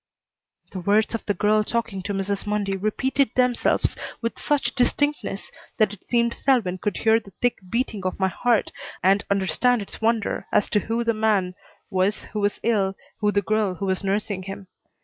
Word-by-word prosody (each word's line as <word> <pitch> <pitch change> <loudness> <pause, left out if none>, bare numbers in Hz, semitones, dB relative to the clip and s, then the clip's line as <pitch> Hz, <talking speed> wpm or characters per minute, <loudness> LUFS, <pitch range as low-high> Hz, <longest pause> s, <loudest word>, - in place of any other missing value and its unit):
The 190 - -5
words 205 +5 +2
of 230 - -3
the 205 - +1
girl 215 +2 +3
talking 230 -3 -2
to 205 +2 -3
Mrs. 195 +1 -2
Mundy 205 -2 0
repeated 260 +7 +1
themselves 250 -2 +2 0.2
with 230 0 -3
such 275 -5 0
distinctness 280 -4 0 0.3
that 215 -2 +3
it 205 - -13
seemed 235 -1 +1
Selwyn 220 -9 +1
would 205 - -1
hear 225 0 +4
the 205 - -15
thick 245 0 +1
beating 225 -3 -1
of 185 +1 -2
my 190 - +3
heart 235 +3 +1 0.3
and 195 +2 +4
understand 200 +6 +2
its 200 - -7
wonder 225 -1 0
as 205 - +2
to 210 - +4
who 230 +3 -1
the 230 0 +2
man 210 -4 +1 0.4
was 190 +2 +1
who 215 - -5
was 205 0 0
ill, 200 -4 +1 0.2
who 210 -1 +2
the 200 0 +1
girl 215 -2 +1
who 200 - -4
was 190 0 -1
nursing 200 0 -1
him. 195 +1 -7
210 Hz, 185 wpm, -24 LUFS, 195-230 Hz, 0.4 s, hear